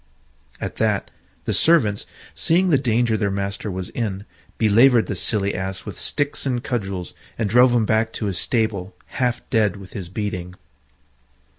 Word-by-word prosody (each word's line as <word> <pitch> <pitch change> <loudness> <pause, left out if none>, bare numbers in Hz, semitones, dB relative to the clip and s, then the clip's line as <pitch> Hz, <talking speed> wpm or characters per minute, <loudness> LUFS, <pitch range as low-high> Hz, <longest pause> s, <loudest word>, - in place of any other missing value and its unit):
At - - -5
that - - 0 0.3
the - - 0
servants, 125 -12 +3 0.3
seeing 165 - +2
the 145 -5 +4
danger 120 -3 +2
their 105 -2 0
master 100 +2 -3
was 95 -1 -4
in, 105 -4 -3 0.3
belaboured 115 +2 +5
the 100 - -3
silly 100 +1 0
Ass 95 +1 -4
with - - -6
sticks 145 0 -1
and 125 -3 -1
cudgels, 100 - -3 0.2
and 115 - 0
drove 125 +4 +5
him 115 -2 +3
back 110 +1 +1
to - - -3
his 95 -3 -1
stable 110 -5 -1 0.3
half 125 -1 0
dead 105 -4 +2
with 95 -2 -11
his 95 -5 -6
beating. 90 -3 -4
110 Hz, 160 wpm, -22 LUFS, 100-120 Hz, 0.3 s, belaboured